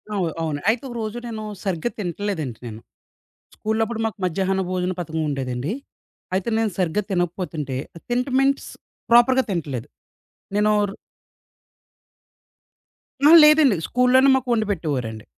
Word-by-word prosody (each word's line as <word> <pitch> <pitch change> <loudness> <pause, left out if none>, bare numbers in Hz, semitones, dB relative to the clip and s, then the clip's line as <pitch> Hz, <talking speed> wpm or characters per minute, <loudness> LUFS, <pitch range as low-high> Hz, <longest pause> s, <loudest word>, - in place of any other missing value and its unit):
అవును. 180 -5 0
అవును. 155 -3 -2
అయితే 230 +3 0
ఒకరోజు 230 -1 -4
నేను, 220 -2 -5 0.2
సరిగ్గా 190 +1 -1
తింటల్లెదండి 175 - -3
నేను. 110 -1 -8 0.8
స్కూల్లో 220 +1 -1
అప్పుడు 225 0 -5
మాకు 220 -3 -5
మజ్యహన్నా 190 +2 0
భోజన 180 0 -1
పథకం 160 -1 -3
ఉండేదండి. 135 +1 -3 0.6
అయితే 190 +3 -1
నేను 225 -1 +1
సరిగ్గా 185 +3 0
తినకపోతుంటే 175 -6 -2 0.3
తింటం 250 +2 -1
మీన్స్ 275 +1 +2 0.4
ప్రాపర్‌గా 240 +2 +6
తినట్లేదు 145 - -3 0.7
నేనోర్ 210 -1 +2 2.4
ఆహా! - - +8
లేదండి. 300 -6 +6
స్కూల్‌లోనే 250 +2 +4
మాకు 260 -1 -2
వండి 220 -2 +1
పెట్టేవారండి. 130 - -3
195 Hz, 115 wpm, -22 LUFS, 160-235 Hz, 2.4 s, ఆహా